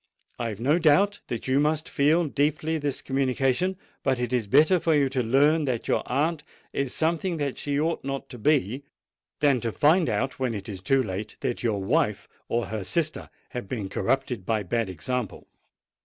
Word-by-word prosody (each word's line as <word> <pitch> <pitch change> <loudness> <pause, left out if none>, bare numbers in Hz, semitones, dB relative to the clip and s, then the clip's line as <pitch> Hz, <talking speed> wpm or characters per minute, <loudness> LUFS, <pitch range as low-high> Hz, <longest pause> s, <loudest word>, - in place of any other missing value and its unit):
I've 115 -4 -3
no 145 +8 +2
doubt 175 +6 +3
that 120 +1 -4
you 130 +1 +3
must 155 +2 +1
feel 155 +4 +2
deeply 155 +2 0
this 145 -2 -2
communication: 135 +7 0 0.2
but 130 -2 0
it 125 0 -2
is 120 -4 0
better 155 - +5
for 165 -1 +2
you 140 -2 +3
to 130 -1 0
learn 145 +6 +3
that 125 -4 -2
your - - +2
aunt 150 +3 0 0.3
is 140 -2 -1
something 165 +2 0
that 145 -3 -3
she 145 0 -1
ought 165 +2 -1
not 135 0 -4
to 125 - -9
be, 135 0 +1 0.6
than 140 -5 +3
to 115 - -1
find 160 - +3
out 130 +7 -1
when 125 -3 -1
it 100 +2 -6
is 95 -4 -6
too 130 +8 +2
late 105 0 -5
that 120 - -2
your 105 -5 0
wife - - +1 0.2
or 120 -1 0
her 105 +1 -4
sister 155 - -1 0.2
have 120 -5 -6
been 100 -3 -4
corrupted 125 +2 -1
by 110 +2 0
bad 115 +2 -1
example." 110 - -4
135 Hz, 185 wpm, -26 LUFS, 115-150 Hz, 0.6 s, better